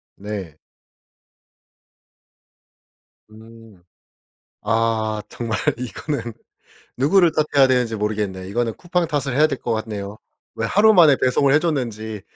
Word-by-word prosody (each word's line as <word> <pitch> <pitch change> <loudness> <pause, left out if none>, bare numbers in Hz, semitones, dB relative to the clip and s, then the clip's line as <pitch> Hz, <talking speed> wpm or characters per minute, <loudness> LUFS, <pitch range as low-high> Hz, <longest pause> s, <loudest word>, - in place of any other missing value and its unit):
네. 95 -6 -7 2.7
음. 110 -3 -16 0.8
아 110 -1 0
정말 115 -2 -4 0.2
이거는 125 - -5 0.7
누구를 165 +6 +4
탓해야 145 -3 +3
되는지 125 -3 +1
모르겠네. 105 -3 -3
이거는 115 +2 -1
쿠팡 175 -1 -1
탓을 140 -4 -2
해야 155 +2 +5
될 135 -4 -4
것 115 - -2
같네요. 105 -2 -5 0.4
왜 115 - -2
하루 215 +2 +5
만에 160 -7 +6
배송을 135 +2 +3
해줬는지. 115 - -1
115 Hz, 230 characters per minute, -21 LUFS, 110-145 Hz, 2.7 s, 만에